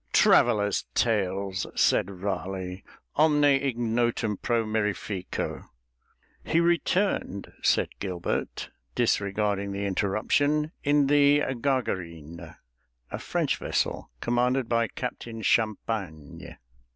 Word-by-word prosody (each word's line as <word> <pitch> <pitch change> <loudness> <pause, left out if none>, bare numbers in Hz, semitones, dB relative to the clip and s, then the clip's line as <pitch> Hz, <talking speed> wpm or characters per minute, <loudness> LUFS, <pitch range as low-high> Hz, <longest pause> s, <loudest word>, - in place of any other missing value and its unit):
"Travellers' 105 -4 +4
tales," 100 -3 0
said - - +3
Raleigh. 95 -1 -4 0.3
"Omne 150 -1 +4
ignotum 120 -5 +1
pro 115 -2 0
mirifico." 105 -3 -3 0.8
"He 165 - +1
returned," 170 - 0
said - - +2
Gilbert, 90 -3 -3 0.2
disregarding 100 -3 0
the 100 +1 -3
interruption, 135 +11 +1
"in 145 0 +3
the 145 +1 +4
Gargarine, 85 - -3 0.6
a - - -4
French - - -1
vessel - - -2
commanded 125 +1 +1
by 115 0 +1
Captain 115 -2 -6
Champagne." 105 -9 -2
110 Hz, 90 wpm, -27 LUFS, 95-130 Hz, 0.8 s, Travellers